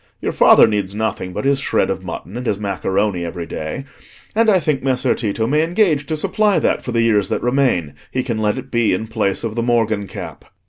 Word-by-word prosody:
Your -, -, -2 dB
father -, -, +6 dB
needs 100 Hz, -3 st, -1 dB
nothing 110 Hz, -4 st, -2 dB
but 90 Hz, -, -4 dB
his 140 Hz, 0 st, +3 dB
shred -, -, +1 dB
of -, -, -4 dB
mutton 95 Hz, -, -7 dB
and 125 Hz, 0 st, -4 dB
his 100 Hz, -, 0 dB
macaroni 100 Hz, -2 st, -1 dB
every 85 Hz, 0 st, -5 dB
day, 80 Hz, -, -5 dB, 0.5 s
and 225 Hz, +1 st, +3 dB
I 190 Hz, -3 st, +5 dB
think 150 Hz, -4 st, -1 dB
Messer 130 Hz, -1 st, +1 dB
Tito 110 Hz, -1 st, -2 dB
may 150 Hz, +6 st, +2 dB
engage 165 Hz, -4 st, +1 dB
to 155 Hz, -, -1 dB
supply 210 Hz, +5 st, +2 dB
that -, -, +1 dB
for 125 Hz, -, -4 dB
the 115 Hz, -1 st, +2 dB
years 105 Hz, -3 st, +2 dB
that -, -, -2 dB
remain; 125 Hz, -, +1 dB, 0.2 s
he 130 Hz, -, -2 dB
can 115 Hz, -3 st, -3 dB
let 105 Hz, +2 st, 0 dB
it 130 Hz, 0 st, -8 dB
be 120 Hz, -5 st, +2 dB
in 110 Hz, -, -4 dB
place 110 Hz, -3 st, -1 dB
of 115 Hz, -2 st, -3 dB
the 115 Hz, -, -1 dB
morgen 115 Hz, -4 st, 0 dB
cap." -, -, -8 dB
115 Hz, 225 wpm, -19 LUFS, 100-135 Hz, 0.5 s, father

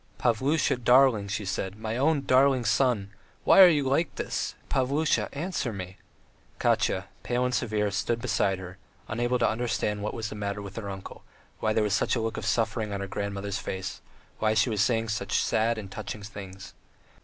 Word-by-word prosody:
"Pavlusha, 130 Hz, +5 st, +1 dB
darling," 125 Hz, -5 st, +5 dB
she 100 Hz, +1 st, -3 dB
said; 95 Hz, +1 st, -3 dB
"my 110 Hz, +1 st, -4 dB
own, 150 Hz, +5 st, +3 dB
my 140 Hz, -, -4 dB
darling 130 Hz, -1 st, +4 dB
son!... 110 Hz, -2 st, +1 dB, 0.3 s
Why -, -, +7 dB
are 185 Hz, -, +11 dB
you 145 Hz, -5 st, +1 dB
like 140 Hz, +6 st, +1 dB
this? -, -, -3 dB
Pavlusha, 140 Hz, +4 st, +1 dB
answer 145 Hz, -4 st, -3 dB
me!" 95 Hz, -2 st, -7 dB, 0.6 s
Katya, -, -, +1 dB, 0.2 s
pale 125 Hz, +1 st, 0 dB
and 125 Hz, -, -1 dB
severe, 105 Hz, -4 st, 0 dB
stood 115 Hz, +4 st, -1 dB
beside 100 Hz, -4 st, +1 dB
her, 90 Hz, +1 st, -9 dB, 0.3 s
unable 120 Hz, +2 st, 0 dB
to -, -, +2 dB
understand 110 Hz, -2 st, -1 dB
what 105 Hz, -, -3 dB
was 110 Hz, -2 st, -3 dB
the -, -, -7 dB
matter 100 Hz, 0 st, -3 dB
with 100 Hz, -1 st, -8 dB
her 105 Hz, -3 st, -4 dB
uncle, 95 Hz, -1 st, -8 dB, 0.4 s
why 110 Hz, -, +1 dB
there 110 Hz, 0 st, +2 dB
was 105 Hz, -2 st, 0 dB
such -, -, +1 dB
a -, -, 0 dB
look 115 Hz, 0 st, -2 dB
of -, -, -4 dB
suffering 110 Hz, -2 st, 0 dB
on 100 Hz, -, -3 dB
her -, -, -2 dB
grandmother's 100 Hz, 0 st, -3 dB
face, 95 Hz, +2 st, -5 dB, 0.4 s
why 110 Hz, 0 st, +2 dB
she 110 Hz, +2 st, +3 dB
was 105 Hz, -2 st, +1 dB
saying 115 Hz, +1 st, +1 dB
such 105 Hz, -, 0 dB
sad 115 Hz, +1 st, +1 dB
and 100 Hz, -3 st, -7 dB
touching 105 Hz, 0 st, -6 dB
things. 100 Hz, -1 st, -9 dB
110 Hz, 190 wpm, -27 LUFS, 100-125 Hz, 0.6 s, are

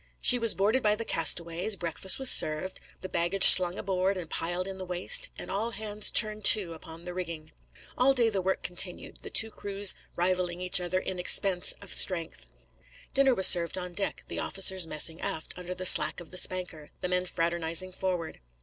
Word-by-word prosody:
She 250 Hz, -, +4 dB
was 230 Hz, -2 st, +5 dB
boarded 215 Hz, +7 st, -1 dB
by 210 Hz, -2 st, +1 dB
the 230 Hz, +2 st, -7 dB
castaways, 170 Hz, +4 st, 0 dB
breakfast 175 Hz, +1 st, -2 dB
was 265 Hz, -1 st, +1 dB
served, 155 Hz, +5 st, 0 dB, 0.2 s
the 185 Hz, -, -7 dB
baggage 175 Hz, +2 st, -1 dB
slung 180 Hz, 0 st, +9 dB
on -, -, -8 dB
board 190 Hz, 0 st, -2 dB
and 175 Hz, -3 st, -8 dB
piled 175 Hz, +4 st, -4 dB
in 190 Hz, -1 st, -9 dB
the -, -, -7 dB
waist, 180 Hz, 0 st, 0 dB
and -, -, -9 dB
all 215 Hz, +4 st, -3 dB
hands 215 Hz, -1 st, -2 dB
turned 215 Hz, -1 st, +3 dB
to 190 Hz, -6 st, +5 dB
upon 165 Hz, +1 st, -14 dB
the 180 Hz, -, -8 dB
rigging. 170 Hz, -4 st, -8 dB, 0.5 s
All 270 Hz, +2 st, +3 dB
day 240 Hz, -3 st, +2 dB
the 200 Hz, -3 st, -3 dB
work 190 Hz, +1 st, -4 dB
continued, 180 Hz, 0 st, -1 dB
the -, -, -10 dB
two 220 Hz, 0 st, +1 dB
crews 200 Hz, -1 st, -1 dB, 0.2 s
rivalling 180 Hz, 0 st, -2 dB
each 180 Hz, 0 st, +3 dB
other 180 Hz, +1 st, -3 dB
in 185 Hz, -1 st, -7 dB
expense 180 Hz, 0 st, +2 dB
of 200 Hz, -, -5 dB
strength. 170 Hz, -, -1 dB, 0.7 s
Dinner 270 Hz, -2 st, +1 dB
was 190 Hz, -, +4 dB
served 170 Hz, 0 st, +5 dB
on 180 Hz, -1 st, -6 dB
deck, 195 Hz, +3 st, -4 dB
the -, -, -7 dB
officers 190 Hz, -2 st, -1 dB
messing 160 Hz, +2 st, -2 dB
aft 160 Hz, -, -5 dB
under 180 Hz, 0 st, -8 dB
the 185 Hz, 0 st, -8 dB
slack 155 Hz, -2 st, +4 dB
of 175 Hz, -, -13 dB
the 185 Hz, -, -9 dB
spanker, 180 Hz, -5 st, -3 dB
the -, -, -3 dB
men 180 Hz, 0 st, -2 dB
fraternising 170 Hz, +2 st, -2 dB
forward. 180 Hz, -3 st, -6 dB
185 Hz, 195 wpm, -26 LUFS, 170-195 Hz, 0.7 s, slung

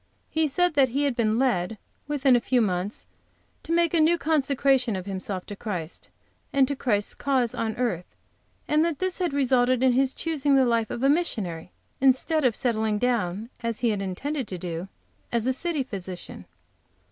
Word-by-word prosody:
He 320 Hz, 0 st, +2 dB
said 355 Hz, +4 st, +2 dB
that 275 Hz, -3 st, +4 dB
he 275 Hz, +4 st, 0 dB
had 280 Hz, -4 st, +1 dB
been 220 Hz, -2 st, +1 dB
led, 225 Hz, -6 st, +1 dB, 0.3 s
within 280 Hz, -3 st, +3 dB
a -, -, +4 dB
few 255 Hz, +1 st, +1 dB
months, 195 Hz, -1 st, -1 dB, 0.6 s
to 325 Hz, -, -7 dB
make 335 Hz, -1 st, +2 dB
a 335 Hz, -, +3 dB
new 325 Hz, +2 st, +4 dB
consecration 275 Hz, -6 st, +2 dB
of 185 Hz, -1 st, -5 dB
himself 190 Hz, -1 st, -4 dB
to 205 Hz, -, -7 dB
Christ 180 Hz, -6 st, -5 dB, 0.4 s
and 275 Hz, -2 st, +3 dB
to 280 Hz, -, -2 dB
Christ's 210 Hz, -6 st, 0 dB
cause 260 Hz, -4 st, 0 dB
on 220 Hz, -1 st, -2 dB
earth, 225 Hz, -9 st, -2 dB, 0.6 s
and 305 Hz, +1 st, +3 dB
that 335 Hz, -3 st, -1 dB
this 370 Hz, 0 st, -1 dB
had 355 Hz, -3 st, 0 dB
resulted 255 Hz, -2 st, +2 dB
in 260 Hz, -, +5 dB
his 265 Hz, +1 st, +1 dB
choosing 295 Hz, -4 st, +1 dB
the 265 Hz, -1 st, +5 dB
life 230 Hz, -2 st, +1 dB
of 240 Hz, -, -4 dB
a -, -, +5 dB
missionary, 210 Hz, -, -1 dB, 0.3 s
instead 270 Hz, +4 st, +3 dB
of 245 Hz, -4 st, +3 dB
settling 220 Hz, -3 st, 0 dB
down, 225 Hz, -2 st, -1 dB
as 230 Hz, -2 st, -2 dB
he 240 Hz, -, +3 dB
had 205 Hz, -2 st, -1 dB
intended 255 Hz, +8 st, -3 dB
to 185 Hz, -, -5 dB
do, 175 Hz, +1 st, -5 dB, 0.4 s
as 235 Hz, -1 st, 0 dB
a 260 Hz, -, +2 dB
city 310 Hz, +1 st, -1 dB
physician. 190 Hz, -6 st, -8 dB
250 Hz, 185 wpm, -26 LUFS, 210-280 Hz, 0.6 s, in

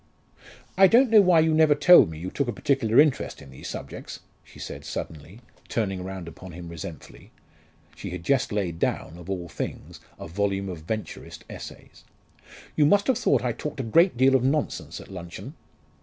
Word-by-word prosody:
"I 195 Hz, -, +9 dB
don't 240 Hz, +3 st, +4 dB
know 215 Hz, -2 st, +8 dB
why 180 Hz, -4 st, +5 dB
you 160 Hz, 0 st, +2 dB
never 155 Hz, -1 st, +5 dB
told 175 Hz, -, +7 dB
me 80 Hz, -, -8 dB
you 90 Hz, +4 st, -6 dB
took 140 Hz, -, -1 dB
a -, -, 0 dB
particular 130 Hz, -2 st, +1 dB
interest 150 Hz, -3 st, +2 dB
in 70 Hz, -2 st, -13 dB
these 65 Hz, -, -10 dB
subjects," -, -, -8 dB, 0.2 s
she -, -, -18 dB
said -, -, -8 dB
suddenly, 80 Hz, +8 st, -7 dB, 0.3 s
turning 95 Hz, -5 st, -2 dB
round 95 Hz, -2 st, -7 dB
upon 85 Hz, +2 st, -10 dB
him 85 Hz, 0 st, -9 dB
resentfully 85 Hz, -1 st, -10 dB, 0.7 s
she 100 Hz, -, -7 dB
had 90 Hz, -1 st, -7 dB
just 135 Hz, +4 st, +1 dB
laid 90 Hz, -6 st, -2 dB
down, 85 Hz, 0 st, -2 dB
of 90 Hz, +1 st, -11 dB
all 90 Hz, -3 st, -3 dB
things, -, -, -7 dB, 0.2 s
a -, -, -8 dB
volume 100 Hz, +2 st, -2 dB
of 90 Hz, -3 st, -6 dB
Venturist 110 Hz, -1 st, -6 dB
essays. -, -, -11 dB, 0.7 s
"You 150 Hz, -, +4 dB
must 200 Hz, +5 st, +4 dB
have 260 Hz, -, +2 dB
thought 130 Hz, -3 st, +2 dB
I 125 Hz, -, 0 dB
talked 150 Hz, +4 st, -6 dB
a -, -, -1 dB
great 165 Hz, -, +3 dB
deal 130 Hz, +2 st, +4 dB
of 130 Hz, -2 st, +3 dB
nonsense 110 Hz, -, -1 dB
at -, -, -13 dB
luncheon." 85 Hz, -2 st, -8 dB
105 Hz, 185 wpm, -25 LUFS, 85-145 Hz, 0.7 s, I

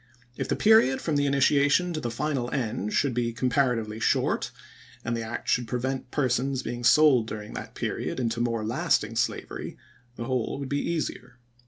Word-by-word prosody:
If -, -, -3 dB
the -, -, +2 dB
period 210 Hz, -12 st, +5 dB
from 155 Hz, -, -1 dB
the 145 Hz, 0 st, +2 dB
initiation 145 Hz, +5 st, +3 dB
to 155 Hz, -, -2 dB
the 120 Hz, -5 st, -3 dB
final 125 Hz, 0 st, -2 dB
end 110 Hz, -5 st, -2 dB
should 140 Hz, +2 st, +1 dB
be 120 Hz, -1 st, -1 dB
comparatively 120 Hz, -3 st, 0 dB
short, -, -, +1 dB, 0.6 s
and 120 Hz, +1 st, -1 dB
the 115 Hz, -, -3 dB
act 115 Hz, +1 st, -5 dB
should 125 Hz, -2 st, +1 dB
prevent 130 Hz, +2 st, -3 dB
persons 130 Hz, 0 st, 0 dB
being 120 Hz, +1 st, -5 dB
sold 130 Hz, -2 st, +5 dB
during 105 Hz, -1 st, -7 dB
that -, -, -7 dB
period -, -, -3 dB
into 115 Hz, -1 st, -1 dB
more 115 Hz, -2 st, -1 dB
lasting 110 Hz, -, 0 dB
slavery, -, -, -3 dB, 0.4 s
the 120 Hz, -, -5 dB
whole 130 Hz, -1 st, -1 dB
would 140 Hz, -2 st, -5 dB
be 145 Hz, 0 st, 0 dB
easier. 135 Hz, -7 st, -3 dB
125 Hz, 175 wpm, -27 LUFS, 115-140 Hz, 0.6 s, period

